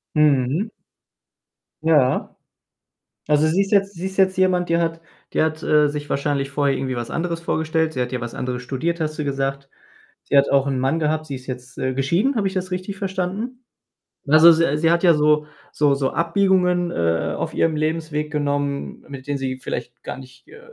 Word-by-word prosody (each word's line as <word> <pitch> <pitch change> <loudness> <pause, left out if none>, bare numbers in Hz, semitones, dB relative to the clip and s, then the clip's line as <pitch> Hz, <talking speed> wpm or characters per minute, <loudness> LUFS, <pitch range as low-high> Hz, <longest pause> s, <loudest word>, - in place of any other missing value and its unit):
Mhm. 150 - +2 1.2
Ja. 145 -6 +2 0.9
Also 150 +1 +3
sie 180 +5 +2
ist 195 - -5
jetzt 200 0 +3
sie 180 +2 -5
ist 190 - -6
jetzt 190 -1 +3
jemand, 180 -2 +2
die 170 0 +2
hat 165 -1 -1 0.3
die - - +2
hat, 155 0 -1
äh, 150 -1 +4
sich 145 0 -5
wahrscheinlich 140 -1 -1
vorher 140 -1 +1
irgendwie 130 -1 -3
was 120 -1 -4
anderes 170 0 -2
vorgestellt. 160 -1 0
Sie 130 - -4
hat 125 +1 -2
ja 125 - -2
was 120 0 -5
anderes 125 0 -4
studiert, 165 +7 -2
hast 155 -1 -2
du 150 - -1
gesagt. 135 0 -2 0.6
Sie 140 - +2
hat 140 - +4
auch 140 0 +3
'n 135 -2 0
Mann 135 +5 +1
gehabt, 155 0 0
sie 140 - -4
ist 130 0 -11
jetzt, 125 -1 -7
äh, 130 0 -1
geschieden. 170 - +1
Habe 205 -3 +1
ich 190 - -4
das 185 -1 -3
richtig 185 +2 -4
verstanden? 195 +6 -4 0.6
Also, 155 +3 +8
s 160 -2 +3
sie 165 - +4
hat 170 +1 +2
ja 170 -2 +7
so 150 0 +3 0.3
so 145 -2 +2
so 135 -1 0
Abbiegungen, 180 0 +2
äh, 85 -1 0
auf - - -3
ihrem 160 -1 +1
Lebensweg 155 -1 -2
genommen, 145 -1 -2
mit 135 -2 -9
denen 145 -1 -1
sie 130 -1 -3
vielleicht 120 -2 -6
gar - - -6
nicht 130 -1 -14
äh, 445 - -13
150 Hz, 195 wpm, -21 LUFS, 135-170 Hz, 1.2 s, Also